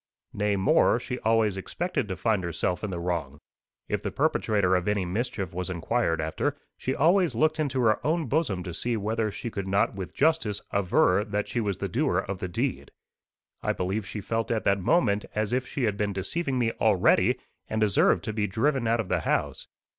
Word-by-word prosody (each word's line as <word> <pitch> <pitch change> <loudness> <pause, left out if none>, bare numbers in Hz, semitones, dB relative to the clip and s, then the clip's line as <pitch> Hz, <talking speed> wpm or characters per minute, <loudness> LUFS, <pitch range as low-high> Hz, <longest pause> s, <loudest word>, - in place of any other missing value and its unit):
Nay 105 0 +1
more, 100 +4 +3
she 125 0 -5
always 110 -3 +2
expected 175 - -2
to 95 - -3
find 110 -3 0
herself 85 +2 -2
in 105 - -2
the 90 -2 -4
wrong. 85 -5 -3 0.5
If - - -1
the - - -2
perpetrator 100 -4 +1
of 90 +1 -1
any 105 -2 +1
mischief 100 -1 -3
was 90 +1 -3
inquired 90 0 0
after, 80 0 -1 0.2
she 130 - -2
always 170 - +3
looked 155 +6 +2
into 135 -4 0
her 110 -3 +2
own 160 +1 +1
bosom 125 - 0
to 90 - -6
see 115 +8 -1
whether 110 +1 -1
she 115 +3 -6
could 100 -2 -4
not 100 +1 +2
with 95 -3 -7
justice 155 -11 +2
aver 100 0 +3
that 105 -1 -2
she 120 - -1
was 100 -4 -1
the 100 - -3
doer 120 - 0
of 95 0 -2
the 95 - -3
deed. 90 - -2 0.7
I - - 0
believe 95 +2 -2
she 105 +2 -5
felt 115 +3 -2
at 115 -2 0
that 100 0 +2
moment 105 - +2
as 110 +1 0
if 125 0 0
she 140 - -3
had 105 -3 +1
been 105 -1 -1
deceiving 130 - -2
me 115 -2 +1
already, - - +4 0.3
and 110 - -1
deserved 105 -3 +3
to 110 - -3
be 105 -1 0
driven 120 +5 0
out 115 +1 +2
of 110 - -2
the 90 -1 +1
house. - - -1
105 Hz, 205 wpm, -27 LUFS, 95-120 Hz, 0.7 s, already